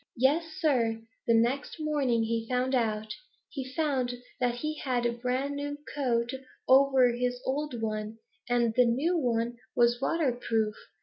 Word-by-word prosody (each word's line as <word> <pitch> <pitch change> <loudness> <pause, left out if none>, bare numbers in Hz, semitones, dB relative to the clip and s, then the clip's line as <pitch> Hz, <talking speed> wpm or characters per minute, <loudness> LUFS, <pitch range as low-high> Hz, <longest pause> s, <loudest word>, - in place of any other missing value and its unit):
Yes, 285 +7 +3
Sir, 235 -8 +2 0.3
the 230 - +5
next 250 +8 0
morning 280 -7 +1
he 225 0 -2
found 255 +1 0
out. 220 -3 0 0.4
He 270 - -4
found 265 -6 0 0.2
that 245 -2 +1
he 305 +4 -4
had 250 -3 -1
a 240 - +2
brand 255 +4 -2
new 290 0 -4 0.2
coat 240 -4 0 0.4
over 265 -1 +6
his 245 +1 -1
old 275 -2 -2
one, 215 0 -3 0.3
and 240 -2 +2
the 250 +1 +5
new 275 +10 +1
one 240 -5 0 0.2
was 240 +1 +3
waterproof. 240 -8 0
245 Hz, 145 wpm, -29 LUFS, 235-275 Hz, 0.4 s, over